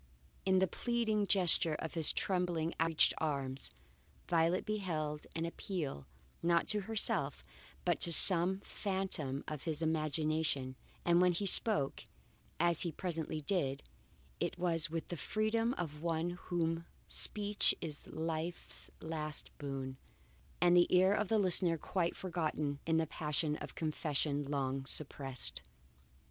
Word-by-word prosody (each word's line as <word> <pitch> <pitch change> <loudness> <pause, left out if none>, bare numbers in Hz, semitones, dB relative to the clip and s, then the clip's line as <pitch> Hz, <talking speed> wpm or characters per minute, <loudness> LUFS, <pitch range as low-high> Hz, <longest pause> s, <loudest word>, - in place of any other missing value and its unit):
In 190 0 +4
the 190 - +4
pleading 220 -2 -1
gesture 170 -5 +5
of 160 - -5
his 165 -3 +5
trembling, 175 -4 -1
outreaching 165 -1 +4
arms, 140 -3 -2 0.6
Violet 170 +2 +2
beheld 160 -8 -3
an 165 0 -1
appeal, 170 - -5 0.3
not 170 0 +2
to 210 -1 +4
herself, 210 - +1 0.4
but - - +1
to 170 - +6
some 185 +3 +6
phantom 190 -11 -1
of 155 0 -6
his 155 -3 -2
imagination; 155 -4 0 0.3
and 175 0 +4
when 180 -1 +4
he 200 +4 -2
spoke, 195 -7 +3 0.5
as 170 0 +2
he 170 - -1
presently 160 -3 -3
did, 140 -5 -1 0.6
it - - -2
was 165 -2 +1
with 165 0 -4
the 175 - -4
freedom 225 - 0
of 150 -4 -5
one 165 0 -1
to 175 - -5
whom 165 -2 -2 0.2
speech 205 0 +1
is 155 -4 -7
life's 160 +2 -4
last 155 -2 -3
boon, 135 -2 -5 0.6
and 175 +1 +4
the 175 0 +6
ear 185 +2 +4
of 210 0 0
the 225 - +3
listener 180 -4 +5
quite 170 +1 -2
forgotten 155 -5 -2
in 165 0 +2
the 160 - +2
passion 150 0 -1
of - - -9
confession 150 -2 -1
long 135 -1 -2
suppressed. 135 - -4
165 Hz, 135 wpm, -34 LUFS, 150-180 Hz, 0.6 s, to